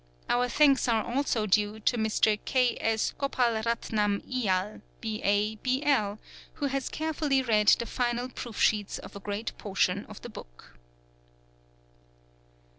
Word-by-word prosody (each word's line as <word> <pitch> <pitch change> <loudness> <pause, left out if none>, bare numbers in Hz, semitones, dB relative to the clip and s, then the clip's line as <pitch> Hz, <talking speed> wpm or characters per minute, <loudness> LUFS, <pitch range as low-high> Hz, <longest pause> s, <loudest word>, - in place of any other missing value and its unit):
Our 245 +1 +1
thanks 275 -1 +4
are 225 -2 +2
also 240 -3 0
due 210 +1 +1
to 245 - +2
Mr. 220 -1 +2
K. 250 -2 +2
S. 225 -1 0
Gopalratnam 230 -5 0
Iyer, 210 -6 -1 0.2
B.A., 215 -1 0
B.L., 255 -5 +1 0.4
who 290 - -3
has 275 -1 -2
carefully 300 -4 0
read 215 -4 +2
the 235 - +5
final 245 +1 -1
proof 240 -3 -8
sheets 210 -2 +2
of - - -11
a - - -6
great 205 +3 -4
portion 195 -1 0
of 210 - -10
the 240 - -7
book. - - -13
225 Hz, 130 wpm, -28 LUFS, 210-255 Hz, 0.4 s, the